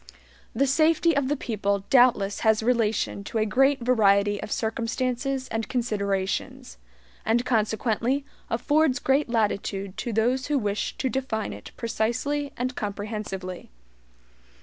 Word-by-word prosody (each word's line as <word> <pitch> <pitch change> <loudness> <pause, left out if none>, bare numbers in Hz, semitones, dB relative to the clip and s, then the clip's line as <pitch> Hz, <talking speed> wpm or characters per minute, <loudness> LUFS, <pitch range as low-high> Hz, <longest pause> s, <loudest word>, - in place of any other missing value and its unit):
The 275 - +3
SAFETY 315 +3 +3
of 280 -2 +1
the 295 +2 0
people 200 -5 -1
doubtless 240 -6 +4
has 220 -1 +3
relation 225 -4 0
to 225 - -3
a 215 - +2
great 270 +4 +3
variety 205 -4 +3
of - - -7
circumstances 250 +4 -2
and 225 +1 -3
considerations, 200 - -2 0.4
and 240 +2 +1
consequently 230 +4 0 0.2
affords 290 +4 +2
great 270 0 +1
latitude 200 -3 -1
to 240 - -3
those 245 +5 +1
who 295 -1 +1
wish 210 -4 -2
to 265 - -1
define 245 - -2
it 100 - -10
precisely 250 +6 -1
and 255 +1 -2
comprehensively. 205 -3 -5
230 Hz, 125 wpm, -25 LUFS, 210-260 Hz, 0.4 s, doubtless